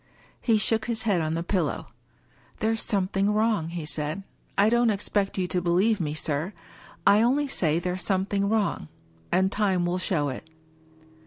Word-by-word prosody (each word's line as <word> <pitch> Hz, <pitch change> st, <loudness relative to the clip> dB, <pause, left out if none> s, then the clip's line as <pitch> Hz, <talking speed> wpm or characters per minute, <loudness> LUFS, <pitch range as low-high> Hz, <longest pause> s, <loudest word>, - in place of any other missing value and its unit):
He 225 Hz, -3 st, +3 dB
shook 220 Hz, +1 st, +1 dB
his 230 Hz, -2 st, -2 dB
head 200 Hz, -6 st, +2 dB
on 155 Hz, 0 st, -1 dB
the 165 Hz, -, -2 dB
pillow. 175 Hz, -5 st, -1 dB, 0.7 s
"There's 225 Hz, +1 st, 0 dB
something 195 Hz, -1 st, +1 dB
wrong," 215 Hz, -5 st, +1 dB
he 170 Hz, -2 st, -5 dB
said. 155 Hz, +5 st, -2 dB, 0.2 s
" -, -, -35 dB
I 200 Hz, +1 st, +5 dB
don't 235 Hz, +1 st, +3 dB
expect 200 Hz, -1 st, -1 dB
you 185 Hz, -1 st, 0 dB
to 180 Hz, -, 0 dB
believe 185 Hz, +5 st, +2 dB
me, 150 Hz, -2 st, -2 dB
sir. 155 Hz, +5 st, -2 dB, 0.5 s
I 200 Hz, +2 st, +6 dB
only 275 Hz, +5 st, +2 dB
say 165 Hz, -, +1 dB
there's 180 Hz, +1 st, -2 dB
something 200 Hz, +1 st, 0 dB
wrong 210 Hz, -, 0 dB, 0.2 s
— 80 Hz, 0 st, -32 dB
^and 190 Hz, +1 st, +2 dB
time 190 Hz, -4 st, +1 dB
will 175 Hz, +1 st, -1 dB
show 150 Hz, -6 st, 0 dB
it." 135 Hz, +5 st, -7 dB
190 Hz, 175 wpm, -26 LUFS, 170-215 Hz, 0.7 s, I